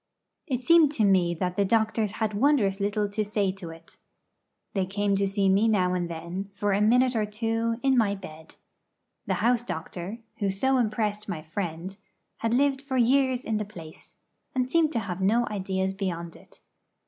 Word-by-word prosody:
It 255 -4 -2
seemed 330 -1 +6
to 220 -7 +2
me 180 -3 +3
that 180 +2 -2
the 200 - +2
doctors 220 0 +1
had 220 -1 -2
wondrous 210 -4 +2
little 205 +1 0
to 215 +1 -1
say 205 -2 0
to 185 -3 -9
it. 165 0 -13 0.8
They 190 -2 0
came 200 +1 0
to 195 0 +1
see 195 0 +1
me 195 +4 +4
now 185 -5 +2
and 175 -1 -1
then, 170 +4 -5
for 205 -1 0
a 200 - +1
minute 250 +3 +4
or 215 -2 +1
two, 225 +2 -1
in 270 -1 +3
my 205 -3 +2
bed. 160 -5 -11 0.7
The - - +1
house 240 0 +3
doctor, 180 +1 -6 0.2
who 200 - 0
so 265 +8 +1
impressed 215 -3 -1
my 160 -5 -4
friend, 170 +2 -5 0.4
had 225 - -1
lived 275 0 +2
for 275 -2 -3
years 260 +1 +3
in 220 - 0
the 210 - -1
place, 175 -5 -12 0.4
and 255 0 0
seemed 325 -1 +3
to 235 - +1
have 190 -2 -5
no 225 +5 +3
ideas 190 -1 -1
beyond 170 -4 -4
it. - - -19
205 Hz, 185 wpm, -26 LUFS, 190-230 Hz, 0.8 s, seemed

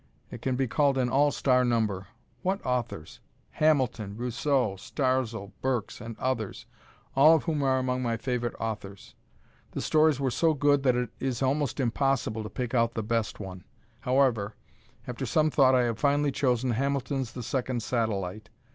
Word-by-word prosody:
It - - -8
can 130 -1 0
be 135 +1 +1
called 140 +3 +2
an 125 -1 +1
"all 145 +2 +4
star" 125 -3 +2
number. 110 -6 0 0.3
What 190 +2 0
authors! 120 -11 -3 0.3
Hamilton, 125 -9 +1
Rousseau, 125 -2 0
Starzl, 120 -4 -1
Burks, 130 -5 -2
and 115 0 -7
others, 125 -6 -3 0.5
all 150 +4 +7
of 160 - 0
whom 155 -3 -1
are 135 -1 +2
among 130 0 -1
my 115 -2 -1
favorite 120 0 -2
authors. 105 -3 -6 0.6
The - - -3
stories 155 -2 +3
were 135 -2 0
so 160 +4 +2
good 145 0 +3
that 130 -2 +3
it 125 -2 -1
is 130 -1 -2
almost 140 +2 0
impossible 130 -3 0
to 105 - -6
pick 125 -2 -4
out 115 -1 +2
the 110 - -2
best 115 0 -1
one. 95 -3 -8 0.4
However, 125 -5 +1 0.5
after 125 +1 -4
some 155 +6 +2
thought 130 -2 +5
I 125 - +4
have 115 -2 -1
finally 145 0 +2
chosen 125 -2 +1
Hamilton's 135 0 -1
"The 125 - -6
Second 125 -1 -2
Satellite." 110 -3 -2
125 Hz, 165 wpm, -28 LUFS, 115-135 Hz, 0.6 s, all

